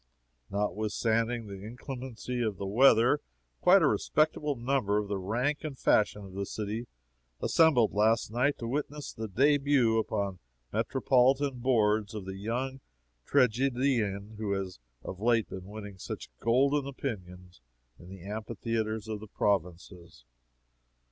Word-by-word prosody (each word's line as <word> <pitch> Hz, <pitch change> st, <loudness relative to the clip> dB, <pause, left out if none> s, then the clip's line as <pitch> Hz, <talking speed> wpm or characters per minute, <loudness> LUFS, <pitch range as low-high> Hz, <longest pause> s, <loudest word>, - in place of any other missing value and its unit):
Notwithstanding 110 Hz, +3 st, 0 dB
the 100 Hz, -1 st, -9 dB
inclemency 125 Hz, +1 st, -6 dB
of 110 Hz, -4 st, -1 dB
the 100 Hz, -, -4 dB
weather, 120 Hz, +5 st, +5 dB, 0.4 s
quite -, -, +6 dB
a -, -, +5 dB
respectable 150 Hz, -1 st, +1 dB
number 120 Hz, -4 st, 0 dB
of 105 Hz, -1 st, -1 dB
the 100 Hz, -1 st, -1 dB
rank 125 Hz, +10 st, -1 dB
and 150 Hz, -4 st, -5 dB
fashion 105 Hz, -3 st, +2 dB
of 95 Hz, -, -12 dB
the 100 Hz, 0 st, -3 dB
city 110 Hz, +3 st, -4 dB, 0.5 s
assembled 150 Hz, -9 st, +4 dB
last 110 Hz, +2 st, +2 dB
night 130 Hz, +5 st, +1 dB
to 115 Hz, -, -5 dB
witness 145 Hz, +3 st, -4 dB
the 110 Hz, 0 st, -5 dB
debut 135 Hz, 0 st, +3 dB
upon 100 Hz, -4 st, -2 dB, 0.3 s
metropolitan 130 Hz, +1 st, +2 dB
boards 110 Hz, -4 st, +2 dB
of 105 Hz, -3 st, -5 dB
the 95 Hz, 0 st, -6 dB
young 125 Hz, +6 st, -3 dB, 0.5 s
tragedian 120 Hz, -4 st, +1 dB
who 105 Hz, -2 st, -1 dB
has 95 Hz, -5 st, -4 dB, 0.2 s
of 95 Hz, -, -7 dB
late 115 Hz, 0 st, +2 dB
been 95 Hz, -1 st, -7 dB
winning 100 Hz, -1 st, -9 dB
such -, -, -7 dB
golden 135 Hz, +4 st, +2 dB
opinions 90 Hz, -, -7 dB, 0.4 s
in 90 Hz, -, -13 dB
the 95 Hz, -2 st, -10 dB
amphitheatres 110 Hz, 0 st, -3 dB
of 110 Hz, -1 st, -4 dB
the 110 Hz, -, -10 dB
provinces. 90 Hz, -7 st, -2 dB
110 Hz, 135 wpm, -30 LUFS, 100-130 Hz, 0.5 s, quite